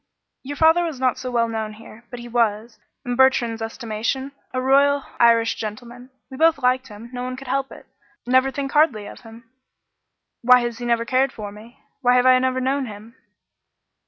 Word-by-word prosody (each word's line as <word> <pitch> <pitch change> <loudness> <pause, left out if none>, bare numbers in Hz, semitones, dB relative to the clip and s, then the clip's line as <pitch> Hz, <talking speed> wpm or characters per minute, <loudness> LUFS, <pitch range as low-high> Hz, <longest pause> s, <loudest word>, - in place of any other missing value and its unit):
"Your 285 +2 -7
father 320 +3 +4
was 320 -6 -4
not 255 -1 0
so 255 - -5
well 235 -2 +1
known 220 -1 -4
here, 225 +1 -14
but 245 - -8
he 240 - -9
was, 230 -1 -1 0.3
in 245 -1 -2
Bertrand's 240 -3 +2
estimation, 230 +4 -4 0.2
a 255 - -2
royal 280 +2 +3 0.2
Irish 230 -1 +4
gentleman. 240 +3 -8 0.2
We 260 - -8
both 325 +1 +4
liked 255 0 0
him; 225 +2 -12
no 245 - -5
one 255 0 -4
could 270 +1 -11
help 270 +1 -2
it. - - -13 0.4
Never 260 +2 +3
think 275 +1 -4
hardly 295 -9 +2
of - - -10
him." 230 +1 -15 0.9
"Why 250 +1 +6
has 240 -1 -4
he 240 - -5
never 235 -1 +1
cared 260 +2 +1
for 210 -4 -8
me? 220 +3 -15 0.2
Why 245 -1 +3
have 250 0 +3
I 255 0 +6
never 260 0 0
known 265 +1 -1
him?" 215 +2 -11
250 Hz, 190 wpm, -22 LUFS, 230-265 Hz, 0.9 s, Why